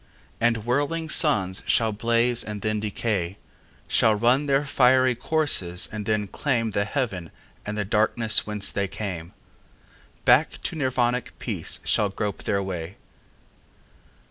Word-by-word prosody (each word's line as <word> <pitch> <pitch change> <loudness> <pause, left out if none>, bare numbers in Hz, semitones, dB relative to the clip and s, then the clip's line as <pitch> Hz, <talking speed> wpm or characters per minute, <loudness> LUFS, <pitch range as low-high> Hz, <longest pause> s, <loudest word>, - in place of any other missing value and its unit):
And 115 -2 +1
whirling 145 +6 -1
suns 100 - +2
shall 115 -1 +2
blaze 115 +2 +1
and 105 -2 -6
then 110 -1 0
decay, 105 -3 -2 0.5
Shall 110 -1 +3
run 125 +7 +2
their 140 +1 +2
fiery 130 -1 +4
courses 120 - 0
and 105 -1 -6
then 110 -2 0
claimThe 115 -4 -1
haven 105 - -3 0.4
of 105 - -3
the 105 -1 -2
darkness 110 +2 +2
whence 105 -1 +1
they 100 -1 -1
came; 90 -4 -6 0.9
Back - - +4
to - - -3
Nirvanic 125 -4 -1
peace - - -2
shall 105 - +2
grope 100 0 -4
their 100 -2 0
way. 90 -1 -5
110 Hz, 130 wpm, -24 LUFS, 100-125 Hz, 0.9 s, fiery